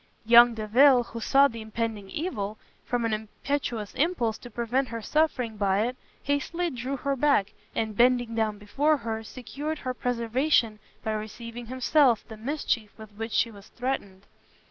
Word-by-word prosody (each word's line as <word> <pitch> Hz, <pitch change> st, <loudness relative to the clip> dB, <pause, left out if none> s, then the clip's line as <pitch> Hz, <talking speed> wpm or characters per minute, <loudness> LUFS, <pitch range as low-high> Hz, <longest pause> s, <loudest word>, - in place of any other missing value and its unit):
Young 235 Hz, +1 st, +8 dB
Delvile, 245 Hz, +4 st, +5 dB
who 235 Hz, -, -8 dB
saw 275 Hz, +4 st, +5 dB
the 230 Hz, -4 st, -8 dB
impending 220 Hz, -2 st, -4 dB
evil, 215 Hz, -, -3 dB, 0.3 s
from 245 Hz, -2 st, -1 dB
an 225 Hz, -, 0 dB
impetuous 220 Hz, 0 st, -3 dB
impulse 260 Hz, -9 st, 0 dB
to 245 Hz, -, -10 dB
prevent 240 Hz, +4 st, -1 dB
her 230 Hz, -1 st, -5 dB
suffering 255 Hz, -6 st, 0 dB
by 200 Hz, -1 st, +2 dB
it, 250 Hz, +1 st, -3 dB, 0.3 s
hastily 335 Hz, +5 st, -1 dB
drew 260 Hz, +2 st, -4 dB
her 275 Hz, +1 st, -1 dB
back, 270 Hz, -7 st, +2 dB, 0.2 s
and 220 Hz, -1 st, -1 dB
bending 245 Hz, 0 st, +3 dB
down 220 Hz, -2 st, 0 dB
before 280 Hz, +10 st, +1 dB
her, 225 Hz, -4 st, -4 dB
secured 280 Hz, +7 st, -5 dB
her 255 Hz, -3 st, -4 dB
preservation 240 Hz, -1 st, +1 dB, 0.2 s
by 220 Hz, -, -1 dB
receiving 230 Hz, +2 st, -6 dB
himself 255 Hz, -1 st, +3 dB
the 220 Hz, -, -9 dB
mischief 230 Hz, -2 st, -2 dB
with 220 Hz, -1 st, -11 dB
which 225 Hz, +2 st, -6 dB
she 230 Hz, +2 st, +2 dB
was 200 Hz, -1 st, -14 dB
threatened. 205 Hz, -7 st, -4 dB
235 Hz, 160 wpm, -27 LUFS, 220-270 Hz, 0.3 s, Young